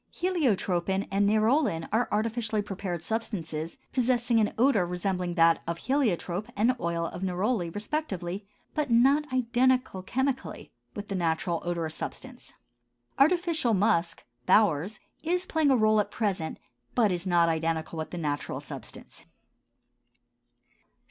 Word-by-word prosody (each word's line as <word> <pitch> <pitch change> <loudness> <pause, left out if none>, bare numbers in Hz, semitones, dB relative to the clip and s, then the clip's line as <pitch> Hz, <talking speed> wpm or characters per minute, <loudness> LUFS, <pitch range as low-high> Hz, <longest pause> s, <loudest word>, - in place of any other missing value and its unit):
Heliotropin 200 - 0
and 200 +1 +3
nerolin 215 - +2
are 235 +2 +2
artificially 220 0 0
prepared 185 -4 -5
substances, 165 -6 -3 0.2
possessing 245 -2 +2
an 210 - +2
odor 245 -5 +4
resembling 180 0 -2
that 165 -1 +4
of 170 0 -2
heliotrope 210 - 0
and 230 +5 +3
oil 170 0 -1
of 175 +2 -6
neroli, 190 +1 0
respectively, 200 - -3 0.3
but 300 -3 -1
not 270 +5 +4
identical 255 -4 +1
chemically 265 +7 -3 0.2
with 205 0 -6
the - - -2
natural 170 -1 0
odorous 170 -2 -2
substance. - - -8 0.7
Artificial 320 -5 +3
musk 180 -4 +1 0.2
(Baur's), 205 -1 +3 0.2
is 355 +3 0
playing 315 -4 +2
a 265 - +5
rôle 215 -1 +4
at 205 - -5
present, 195 -7 -2 0.4
but 220 -5 +4
is 180 +1 -2
not 170 -2 +4
identical 160 0 -1
with 155 - -4
the 175 - -6
natural 145 -3 -3
substance. - - -10
205 Hz, 130 wpm, -28 LUFS, 175-245 Hz, 0.7 s, a